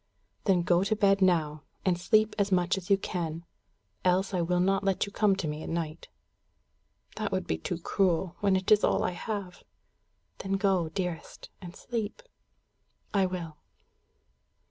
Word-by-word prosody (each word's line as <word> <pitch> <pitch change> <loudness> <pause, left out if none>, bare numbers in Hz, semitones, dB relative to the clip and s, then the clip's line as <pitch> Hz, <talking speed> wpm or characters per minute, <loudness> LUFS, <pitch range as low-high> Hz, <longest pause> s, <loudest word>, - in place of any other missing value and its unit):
"Then 185 -4 +3
go 175 +1 +3
to 200 +2 +1
bed 200 -1 +3
now, 160 -5 +2 0.2
and 185 -2 +3
sleep 215 +4 +2
as 200 0 +1
much 180 0 +2
as 190 -2 -7
you 195 - +5
can; 170 -3 -4 0.6
else 185 +2 +2
I 180 - +1
will 175 +1 +1
not 195 +2 +2
let 195 0 +1
you 200 - -10
come 200 -1 +3
to 185 -4 -3
me 150 +1 -4
at - - -6
night." 165 -2 -4 1.1
"That - - -2
would - - -1
be 80 - -2
too 165 - -3
cruel, 180 0 0
when 200 -2 +2
it 190 +2 -1
is 210 -1 +6
all - - +2
I - - 0
have." 190 0 -5 0.8
"Then 195 0 -3
go, 195 -4 +1
dearest, 175 -1 -5
and 175 -1 -9
sleep." 230 - -4 0.9
"I 195 -2 +3
will." 170 -4 -6
185 Hz, 165 wpm, -29 LUFS, 170-195 Hz, 1.1 s, is